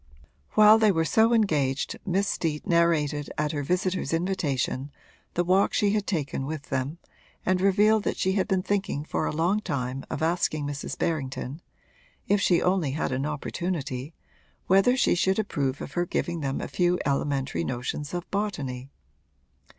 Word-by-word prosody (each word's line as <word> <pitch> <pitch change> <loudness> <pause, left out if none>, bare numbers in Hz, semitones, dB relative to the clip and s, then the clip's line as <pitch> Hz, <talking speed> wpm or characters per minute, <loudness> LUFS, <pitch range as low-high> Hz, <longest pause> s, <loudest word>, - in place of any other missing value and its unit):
While 215 +1 +7
they 215 -2 +5
were 165 -3 +1
so 220 +7 +4
engaged 150 - +1
Miss 195 +2 +1
Steet 155 -5 -2
narrated 155 -4 +2
at 150 0 0
her 145 - -2
visitor's 180 +4 -1
invitation 150 -6 -1 0.5
the 175 - +2
walk 185 +3 +3
she 205 -1 +3
had 210 -1 -1
taken 140 -6 -2
with 155 -1 -6
them 135 +4 -2 0.5
and 185 0 +2
revealed 210 +3 +4
that - - -1
she 190 - +1
had 190 +1 +1
been 190 -3 +1
thinking 195 -7 -1
for 155 - -1
a - - -1
long 170 +7 +1
time 135 -7 -3
of - - -3
asking 160 -3 0
Mrs. 145 +1 -5
Berrington 140 -1 -3 0.7
if 205 0 +3
she 175 -3 +3
only 180 -7 +1
had 150 - -1
an 135 +3 -1
opportunity 150 -2 -4 0.5
whether 195 +7 +4
she - - +3
should 190 +2 +2
approve 145 -10 -1
of - - -6
her 175 0 0
giving 170 0 -2
them 135 -2 -2
a - - -4
few 180 0 +1
elementary 140 - 0
notions 125 - -4
of 175 0 -4
botany. 140 -11 -3
165 Hz, 165 wpm, -26 LUFS, 140-190 Hz, 0.7 s, While